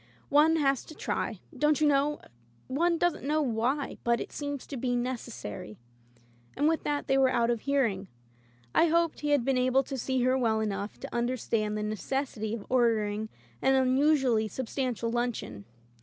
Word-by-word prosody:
One 305 +3 +5
has 275 -4 +2
to 310 - -11
try, - - -3
don't 300 0 +2
you 310 - +3
know? 290 +1 +2 0.4
One 335 +6 +1
doesn't 350 0 0
know 300 +3 +1
why 255 +3 -1
— - - -35
but 235 0 +2
it - - -6
seems 285 -2 -5
to 280 - -7
be 245 0 -1
necessary 240 - -5 0.3
— 120 0 -32
" 120 0 -31
and 290 - +3
with 320 0 +1
diat 290 -1 -1
they 270 -1 +2
were 265 -1 +5
out 235 -1 +2
of 235 -2 -2
hearing. 235 -9 0 0.7
I 335 - +5
hoped 335 0 +1
he 295 - -2
had 285 -5 +3
been 265 -1 +2
able 255 +1 +3
to 270 0 -5
see 260 +1 0
her 255 +1 +3
well 225 -4 +1
enough 205 -1 -3
to - - -7
under 240 +2 0
stand 215 -2 -1
the 210 - -2
necessity 220 +1 -2
of 215 - -8
ordering 220 -4 +1 0.3
an 265 - +4
unusually 260 -3 +3
substantial 245 0 -3
luncheon. 235 - -3
255 Hz, 185 wpm, -29 LUFS, 220-285 Hz, 0.7 s, One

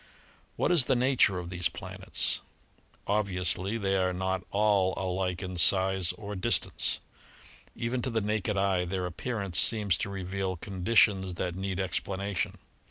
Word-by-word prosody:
What - - +1
is 165 -8 +6
the 130 - +2
nature 125 -6 +3
of 90 0 -6
these 90 -1 0
planets? - - -2 0.7
Obviously 95 -1 -1
they 95 -3 0
are 90 -1 +1
not 95 0 -2
all 100 -2 +2
alike 95 0 -2
in 90 -1 -5
size 95 -1 +5
or 105 -1 -7
distance. 95 - +1 0.8
Even 120 +1 -2
to 130 - -2
the 115 -2 0
naked 105 -1 -1
eye 95 -2 +1
their 90 +1 -3
appearance 95 0 -2
seems 105 -5 +3
to - - -2
reveal 95 -1 -3
conditions 95 0 +2
that 90 0 -3
need 95 0 -4
explanation. 95 +1 -2
95 Hz, 145 wpm, -29 LUFS, 90-105 Hz, 0.8 s, is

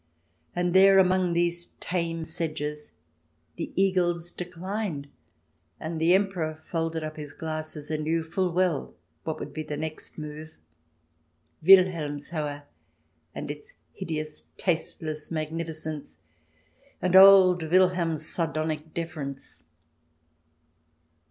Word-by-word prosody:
And 175 0 0
there, 195 +1 +7
among 185 -1 +4
these 175 0 -1
tame 170 -2 -2
sedges, 150 -2 -4 0.6
the - - -4
Eagles 175 -3 +1
declined 180 -3 -4 0.7
and 160 0 -4
the 170 +3 +5
Emperor 185 -5 0
folded 160 0 -3
up 155 0 -6
his 150 -1 -7
glasses 155 -1 -5
and 155 -1 -1
knew 165 +1 +1
full 175 +3 -1
well 175 -4 0 0.3
what 160 - -2
would - - -7
be 155 - -4
the 150 -1 -5
next 155 +1 -6
move 155 +1 -8 0.5
— 80 - -36
Wilhelmshohe 155 -5 +3 0.7
and - - -4
its 145 0 -11 0.2
hideous 155 -4 -5
tasteless 155 -3 -2
magnificence, 155 - -4 0.8
and 180 0 +1
old 190 -2 +9
Wilhelm's 175 -4 +2
sardonic 155 -1 -2
deference. 150 -5 -6
160 Hz, 105 wpm, -27 LUFS, 155-180 Hz, 0.8 s, old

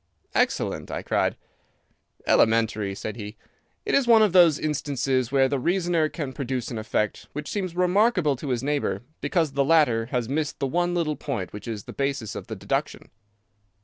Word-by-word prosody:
"Excellent!" - - 0
I - - -4
cried. - - 0 0.9
"Elementary," 110 -3 +2
said 110 +2 -6
he. 105 0 -7 0.5
"It - - -1
is 275 -3 +3
one 225 -2 +7
of 205 -4 +2
those 170 -5 +6
instances 135 -4 -1
where 135 -1 +4
the 140 0 -1
reasoner 170 0 +1
can 145 -5 -5
produce 130 -3 -3
an 115 - -3
effect 105 -1 -2
which 150 0 -5
seems 185 -4 -3
remarkable 180 - +3
to 140 +2 -6
his 125 -1 -1
neighbour, 145 -3 -1 0.2
because 165 -6 +1
the 140 0 +1
latter 135 -7 +3
has 125 -2 -2
missed 150 +3 -2
the 140 - -1
one 175 +5 0
little 160 -3 0
point 120 -11 -4
which 105 +3 -8
is 110 -4 -4
the - - -10
basis 140 -5 -2
of - - -7
the - - -5
deduction. - - -3
140 Hz, 180 wpm, -25 LUFS, 120-170 Hz, 0.9 s, one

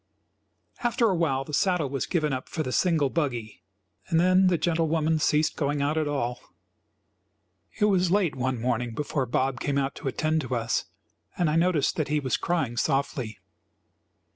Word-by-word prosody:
After 240 -2 +2
awhile 160 -7 +1
the 150 - -10
saddle 180 -1 +2
was 135 -1 -3
given 155 -5 0
up 130 0 -5
for 160 - -2
the 130 - -4
single 155 -4 +2
buggy, 120 - -3 0.5
and 165 - +2
then 185 +2 +4
the 180 -2 +3
gentle 165 0 +1
woman 160 0 +1
ceased 150 +1 +2
going 145 -1 -1
out 145 +2 0
at 155 -1 0
all. 125 -4 -2 1.4
It 210 - +4
was 185 -4 +3
late 190 -3 +2
one 130 -1 -1
morning 120 -1 -1
before 140 -1 -2
Bob 130 +1 0
came 140 -1 -1
out 135 0 0
to - - -6
attend 155 +4 0
to 130 -2 -3
us, 115 -1 -1 0.5
and 170 -4 +2
I - - 0
noticed 165 -3 +2
that 155 - 0
he 150 0 +1
was 130 -4 0
crying 155 -9 -1
softly. 135 -6 -1
150 Hz, 175 wpm, -26 LUFS, 130-165 Hz, 1.4 s, then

